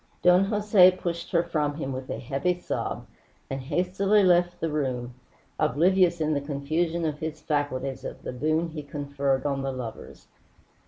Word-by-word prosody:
Don 180 +2 +6
Jose 205 -2 +5
pushed 170 -2 -4
her 170 - +2
from 150 -4 -1
him 135 -3 -4
with 130 0 -6
a - - -3
heavy 140 +8 -1
sob - - -3 0.5
and 135 0 -3
hastily 185 +8 +2
left 175 -1 +3
the 165 - -1
room, 130 -5 -2 0.5
oblivious 175 +4 +3
in 155 0 +1
the 140 - 0
confusion 155 +4 -1
of 150 -2 -2
his 160 -1 -4
faculties 145 -4 -2
of - - -7
the - - -5
boon 155 +6 0
he 155 -1 -6
conferred 140 -2 -2
on 140 -1 0
the 135 0 -2
lovers. 125 -4 -8
155 Hz, 165 wpm, -26 LUFS, 140-175 Hz, 0.5 s, Don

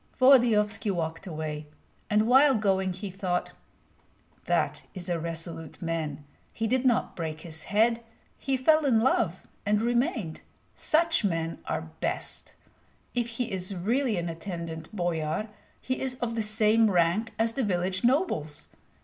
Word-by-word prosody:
Volodyovski 230 -6 +5
walked 165 0 -2
away, 155 -2 -4 0.4
and 215 +1 +3
while 265 +3 +6
going 190 -3 +1
he 190 +2 -6
thought: 180 -1 -2 0.9
"That - - +1
is 180 -1 -3
a 170 -1 0
resolute 165 -1 -4
man. 155 -4 -3 0.3
He 225 - -3
did 255 +3 +1
not 245 -3 +2
break 160 -2 -4
his 160 -1 -5
head; 230 +3 +2 0.4
he 270 -1 0
fell 310 +4 +4
in 240 -5 +4
love 220 -7 +1 0.2
and 210 0 +2
remained. 235 - 0 0.3
Such 330 -2 +2
men 165 -4 -1
are 160 0 -3
best. - - -3 0.6
If 240 -1 0
he 235 0 -3
is 190 +1 -3
really 225 +5 +1
an 175 0 -2
attendant 165 -2 -6
boyar, 175 0 -1 0.3
he 260 - -3
is 260 -1 -1
of 240 -2 -3
the 230 - -1
same 215 +1 +3
rank 180 +5 +2
as 225 +1 +1
the 270 - -1
village 185 -2 -1
nobles. 240 - 0
205 Hz, 145 wpm, -28 LUFS, 165-235 Hz, 0.9 s, while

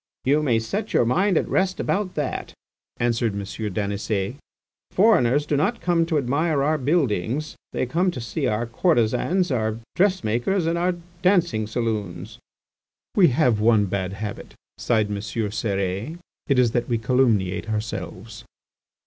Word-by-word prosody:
"You 145 +3 +3
may 125 -7 +2
set 200 - -3
your - - +4
mind 180 - +2
at - - 0
rest 185 -1 0
about 195 -2 -1
that," 145 -3 -3 0.4
answered 115 -2 0
M. 100 - -3 0.3
Daniset. 100 +1 -2 0.6
"Foreigners 150 - +3
do 150 - 0
not 195 +12 +1
come 170 -2 +1
to 160 -2 +1
admire 145 +2 +1
our 155 +1 +1
buildings; 140 - 0 0.2
they - - -1
come 170 +9 +1
to 155 - -5
see 110 -4 -2
our 110 +2 0
courtesans, 160 - +1
our 110 -3 0 0.2
dressmakers, 185 - +1
and 165 +1 +1
our 175 +1 +1 0.3
dancing 175 - +2
saloons." 110 -2 -3 0.8
"We 185 -4 +6
have 125 -5 +2
one 110 -1 +4
bad 95 -1 -2
habit," 105 +1 -7 0.2
sighed 110 -3 +1
M. 100 - -2
Cérès, 105 - -2 0.3
"it 140 - +2
is 125 -2 +4
that 120 +1 -1
we 120 - +2
calumniate 110 -4 +1
ourselves." 110 +1 -5
125 Hz, 145 wpm, -23 LUFS, 110-165 Hz, 0.8 s, We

